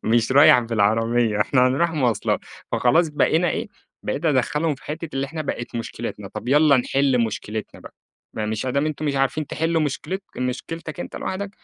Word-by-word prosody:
مش 115 +2 +2
رايح 140 -2 +8
بالعربيّة، 115 0 +1
إحنا 125 +4 +3
هنروح 165 +7 +1
مواصلات. 130 -8 0 0.3
فخلاص 160 +7 +3
بقينا 160 +3 +2
إيه، - - -3 0.3
بقيت 155 - -3
أدخلّهم 150 +2 +1
في 135 - -19
حتّة 155 +2 -5
اللي 135 0 -1
إحنا 155 +2 -5
بقِت 120 -4 -5
مشكلتنا، 115 - -5
طب 125 - -7
يالّا 145 0 +5
نحل 130 -1 +2
مشكلتنا 110 -1 -5
بقى، - - -13 0.4
ما 105 -1 -2
مش 110 +3 -3
أدام 140 +4 0
أنتم 155 0 -3
مش 140 - 0
عارفين 135 +2 0
تحلوا 165 +1 0
مشكلت 165 +7 -3 0.2
مشكلتك 155 +6 -4
أنت - - -6
لوحدك، 195 +1 -4
135 Hz, 170 wpm, -22 LUFS, 120-155 Hz, 0.4 s, رايح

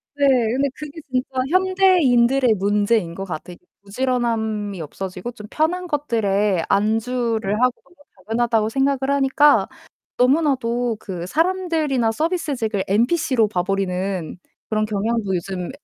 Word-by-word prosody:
네. 285 - +1 0.3
근데 275 +2 +1
그게 300 +1 -9
진짜 255 0 0 0.2
현대인들의 310 - +3
문제인 205 -2 +1
것 195 +3 -6
같아요. 175 0 -7 0.3
부지런함이 220 -4 -2
없어지고 185 +7 -6
좀 210 -3 -11
편한 355 +4 -1
것들에 210 - 0
안주를 225 0 0
하고 250 -1 +3 0.2
이게 350 - -24 0.3
당연하다고 225 -1 +1
생각을 270 +2 +1 0.2
하니까 280 +2 +4 0.5
너무나도 250 -4 +1
그 180 -4 -6
사람들이나 320 - 0
서비스직을 270 - -2
NPC로 235 - +2
봐 180 -4 -1
버리는 190 -2 -2 0.3
그런 215 -1 +1
경향도 210 -1 -1
요즘 180 0 -4
230 Hz, 310 characters per minute, -21 LUFS, 200-275 Hz, 0.5 s, 하니까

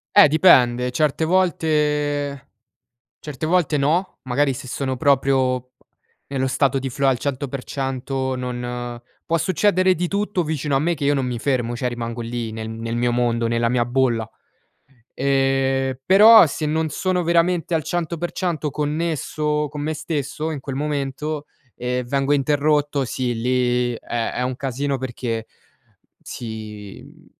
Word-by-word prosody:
Eh, - - +9
dipende. 125 -6 +4
Certe 150 +4 +1
volte 150 -5 0 0.7
certe 150 -1 -6
volte 165 -3 +2
no, 160 +7 0
magari 135 +2 +1
se 130 +1 -7
sono 130 0 -3
proprio 130 -2 +2 0.6
nello 135 -1 -1
stato 135 0 +1
di 135 0 -4
flow 135 +2 0
al 130 - +1
100% 135 -1 -3
non 120 -1 -5 0.2
può 165 - +1
succedere 185 +2 +2
di 175 +1 -2
tutto 200 -2 -1
vicino 150 -2 -1
a - - +3
me 170 +4 +1
che 145 -2 -3
io 145 - +3
non 135 -2 0
mi 120 -2 -3
fermo, 120 -3 -1
cioè 125 - -1
rimango 120 -1 -4
lì, 115 -1 -4
nel 110 0 -6
nel 115 +1 -4
mio 120 0 +1
mondo, 120 -1 +1
nella 115 0 +1
mia 120 -1 +1
bolla. 120 -3 0 0.8
Ehm, 135 -1 +1
però 210 0 +8
se 155 +1 -3
non 160 +1 0
sono 180 +4 -1
veramente 170 0 +1
al 160 - 0
100% 170 0 -2
connesso 150 0 -1
con 145 +1 -6
me 155 +2 -1
stesso 150 0 -3
in 145 -4 -5
quel 135 -1 -5
momento, 145 +1 -3 0.3
ehm, 125 0 -2
vengo 135 +2 0
interrotto, 145 0 +1
sì 125 -1 -2
lì 125 +1 +1
è 115 0 -3
è - - -2
un 125 0 -2
casino 135 +1 -2
perché 120 -3 -4 0.8
si, 110 -3 -8
mhmm, - - -17
135 Hz, 145 wpm, -22 LUFS, 125-155 Hz, 0.8 s, Eh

